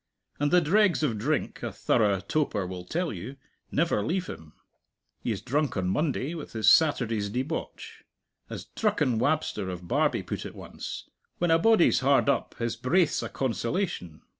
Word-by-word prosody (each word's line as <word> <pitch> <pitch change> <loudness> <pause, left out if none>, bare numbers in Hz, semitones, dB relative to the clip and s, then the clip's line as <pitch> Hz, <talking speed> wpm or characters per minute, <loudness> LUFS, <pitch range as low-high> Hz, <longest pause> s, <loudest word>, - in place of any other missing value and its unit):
And 145 0 +2
the 180 +2 +5
dregs 185 +1 +3
of 115 -8 0
drink, 150 +7 -1
a - - -3
thorough 100 -3 +2
toper 105 -3 -1
will 90 -1 -7
tell 170 - -2
you, 105 +9 -7 0.4
never 165 -8 +1
leave 180 - -1
him. 80 - -9 0.7
He - - -2
is 100 - -4
drunk 140 -1 0
on 90 -1 0
Monday 145 - -1
with 160 -4 -8
his 110 -2 -1
Saturday's 115 -8 +4
debauch. 130 +9 -5 0.5
As - - -6
"Drucken 150 - 0
Wabster" 125 -7 0
of 90 -1 -7
Barbie - - +1
put - - -4
it - - -8
once, - - -7 0.3
"When 175 -1 +1
a 165 - +5
body's 220 -1 +4
hard 140 +1 +3
up, 140 - 0
his 115 -1 -2
braith's 150 +7 +2
a - - -4
consolation." 120 - -2
135 Hz, 165 wpm, -27 LUFS, 105-165 Hz, 0.7 s, the